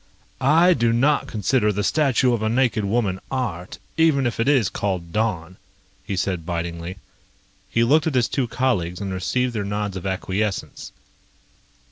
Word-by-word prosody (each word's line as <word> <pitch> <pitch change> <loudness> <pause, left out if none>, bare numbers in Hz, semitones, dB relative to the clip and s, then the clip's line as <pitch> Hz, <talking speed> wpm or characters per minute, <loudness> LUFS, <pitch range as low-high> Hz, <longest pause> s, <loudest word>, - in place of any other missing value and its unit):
"I 165 +7 +5
do 120 -6 +1
not 140 +6 +2
consider 105 +1 +1
the 105 0 -2
statue 135 -2 +2
of 115 - -1
a 110 - 0
naked 120 -2 +1
woman 100 -3 0
art, 100 -10 -4 0.2
even 155 -5 +3
if 120 -2 -2
it 115 - +1
is 135 -8 +4
called 90 -5 -3
'Dawn,'" 95 -5 -2 0.5
he 100 -1 -4
said 90 -2 -1
bitingly. 85 +1 -4 0.7
He 115 - +2
looked 150 +7 +3
at 155 - -1
his 125 -3 +3
two 135 -4 -1
colleagues 95 -10 -1
and 100 -2 -4
received 125 +7 -1
their 110 -3 -2
nods 105 -1 -3
of 95 +1 -5
acquiescence. 95 +2 -3
110 Hz, 160 wpm, -22 LUFS, 95-130 Hz, 0.7 s, I